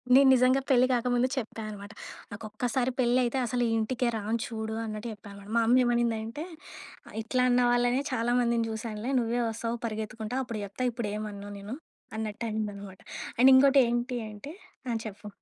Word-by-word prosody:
నేను 275 Hz, 0 st, +7 dB
నిజంగా 255 Hz, +1 st, +4 dB
పెళ్లి 255 Hz, -1 st, +6 dB
కాకముందు 245 Hz, +1 st, +2 dB
చెప్పా 225 Hz, -2 st, -4 dB
అనమాట. 205 Hz, 0 st, -8 dB, 0.4 s
నాకొక్కసారి 240 Hz, +5 st, -2 dB
పెళ్ళయితే, 245 Hz, +1 st, +2 dB
అసలు 245 Hz, +1 st, 0 dB
ఈ -, -, 0 dB
ఇంటికే 250 Hz, +3 st, 0 dB
రాను 220 Hz, +2 st, -1 dB
చూడు 220 Hz, -1 st, -4 dB
అన్నట్టు 215 Hz, +1 st, -5 dB
చెప్పానమాట. 200 Hz, -1 st, -12 dB
మా 230 Hz, -, +5 dB
అమ్మ 255 Hz, +2 st, +6 dB
ఏమనిందంటే, 235 Hz, +3 st, 0 dB, 0.6 s
ఆహ్, -, -, -12 dB
"ఇట్లా 250 Hz, +3 st, 0 dB
అన్న 245 Hz, 0 st, +4 dB
వాళ్ళనే 245 Hz, +2 st, +2 dB
చాలా 240 Hz, 0 st, +1 dB
మందిని 235 Hz, -1 st, +2 dB
చూశానులే, 220 Hz, +2 st, -4 dB
నువ్వే 240 Hz, +1 st, 0 dB
వస్తావు 230 Hz, +1 st, -3 dB
పరిగెత్తుకుంటా, 220 Hz, +2 st, -4 dB
అప్పుడు 225 Hz, -4 st, -5 dB
చెప్తా, 205 Hz, +6 st, -4 dB
ఇప్పుడేమనను 210 Hz, -3 st, -5 dB
నేను," 210 Hz, +6 st, -6 dB, 0.4 s
అన్నట్టనిందనమాట. 210 Hz, -3 st, -4 dB, 0.4 s
అండ్ 265 Hz, +2 st, +8 dB
ఇంకోటేంటి 255 Hz, -2 st, +4 dB
అంటే 210 Hz, +9 st, -9 dB, 0.4 s
ఆ! -, -, +1 dB
చెప్పు. 210 Hz, 0 st, -8 dB
230 Hz, 150 wpm, -29 LUFS, 215-250 Hz, 0.6 s, అండ్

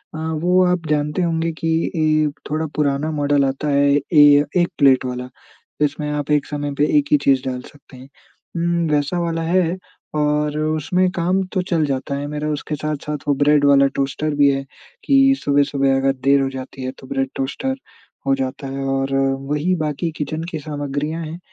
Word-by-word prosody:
अ, -, -, -5 dB, 0.2 s
वो 180 Hz, +2 st, +4 dB
आप 180 Hz, -2 st, 0 dB
जानते 150 Hz, +3 st, 0 dB
होंगे 165 Hz, -1 st, 0 dB
कि 165 Hz, -, -1 dB, 0.3 s
ए, 155 Hz, -1 st, +2 dB, 0.2 s
थोड़ा 155 Hz, +2 st, -1 dB
पुराना 150 Hz, +1 st, 0 dB
मॉडल 145 Hz, -2 st, +1 dB
आता 135 Hz, +3 st, -2 dB
है, 140 Hz, 0 st, +3 dB, 0.2 s
ए, 145 Hz, -1 st, +7 dB
1 175 Hz, -1 st, +3 dB
प्लेट 135 Hz, -3 st, +4 dB
वाला, 125 Hz, 0 st, -4 dB, 0.5 s
जिसमें 150 Hz, 0 st, 0 dB
आप 150 Hz, 0 st, -3 dB
एक 145 Hz, -1 st, +2 dB
समय 145 Hz, -1 st, -4 dB
पे 145 Hz, -, +5 dB
एक 290 Hz, -, +3 dB
ही 295 Hz, -, +6 dB
चीज़ 135 Hz, -2 st, +4 dB
डाल 125 Hz, -1 st, -4 dB
सकते 145 Hz, -1 st, -16 dB
हैं। 130 Hz, +2 st, -13 dB, 0.5 s
उम, 170 Hz, 0 st, 0 dB
वैसा 150 Hz, +4 st, 0 dB
वाला 165 Hz, -1 st, -1 dB
है 175 Hz, +1 st, +1 dB, 0.4 s
और 150 Hz, 0 st, 0 dB
उसमें 155 Hz, +4 st, +1 dB
काम 180 Hz, +1 st, 0 dB
तो 185 Hz, -, +1 dB
चल 165 Hz, -3 st, +2 dB
जाता 140 Hz, 0 st, -2 dB
है 140 Hz, +1 st, -4 dB
मेरा, 150 Hz, +1 st, -3 dB
उसके 150 Hz, 0 st, -3 dB
साथ-साथ 150 Hz, 0 st, -4 dB
वो 145 Hz, -, +3 dB
ब्रेड 145 Hz, +1 st, +3 dB
वाला 140 Hz, -1 st, +5 dB
टोस्टर 140 Hz, +2 st, -1 dB
भी 145 Hz, -1 st, +5 dB
है 135 Hz, 0 st, -3 dB, 0.4 s
कि 270 Hz, -1 st, +5 dB
सुबह-सुबह 140 Hz, -1 st, +2 dB
अगर 135 Hz, 0 st, +2 dB
देर 140 Hz, 0 st, +4 dB
हो 135 Hz, -, 0 dB
जाती 130 Hz, 0 st, -8 dB
है, 130 Hz, -, -3 dB
तो 130 Hz, -, -12 dB
ब्रेड 135 Hz, 0 st, -1 dB
टोस्टर 200 Hz, -, -2 dB, 0.5 s
हो 135 Hz, -, +4 dB
जाता 135 Hz, +1 st, -4 dB
है 135 Hz, 0 st, -4 dB
और 135 Hz, 0 st, -1 dB
वही, 135 Hz, +5 st, 0 dB
बाकी 155 Hz, 0 st, -2 dB
किचन 155 Hz, +2 st, -3 dB
की 160 Hz, -, -4 dB
सामग्रियाँ 145 Hz, +2 st, -4 dB
हैं 160 Hz, +2 st, -7 dB
150 Hz, 185 wpm, -20 LUFS, 140-160 Hz, 0.5 s, ए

